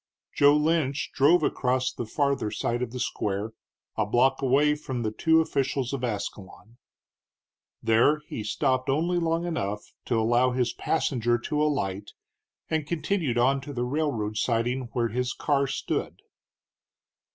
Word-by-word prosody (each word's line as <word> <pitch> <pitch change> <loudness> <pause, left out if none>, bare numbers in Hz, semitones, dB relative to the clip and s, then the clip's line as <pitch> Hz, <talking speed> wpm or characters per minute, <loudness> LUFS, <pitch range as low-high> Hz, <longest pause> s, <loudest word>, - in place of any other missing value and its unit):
Joe 145 +1 +5
Lynch 150 -2 0
drove 150 +6 +4
across 130 0 0
the 120 - -5
farther 140 -3 0
side 120 +3 -2
of 125 - -2
the 125 - -6
square, 105 -1 -2 0.4
a 110 - +1
block 125 +6 +2
away 140 +3 +3
from 130 -5 -4
the 110 - -1
two 160 +8 +3
officials 135 -4 -1
of 135 -2 -3
Ascalon. 105 0 -5 1.1
There 120 +7 +3
he 115 - -6
stopped 130 +4 0
only 170 +6 +1
long 165 0 0
enough 105 - -4
to 115 -3 +1
allow 120 +3 +2
his 125 -1 0
passenger 120 -7 0
to 150 +5 -2
alight, 105 -10 -1 0.5
and 160 -2 -1
continued 165 -6 -1
on 135 +3 +3
to 145 +2 -8
the 120 -1 -2
railroad 125 -7 -1
siding 120 +3 0
where 120 -2 0
his 125 +3 -2
car 140 -2 +1
stood. - - -3
130 Hz, 145 wpm, -26 LUFS, 115-150 Hz, 1.1 s, Joe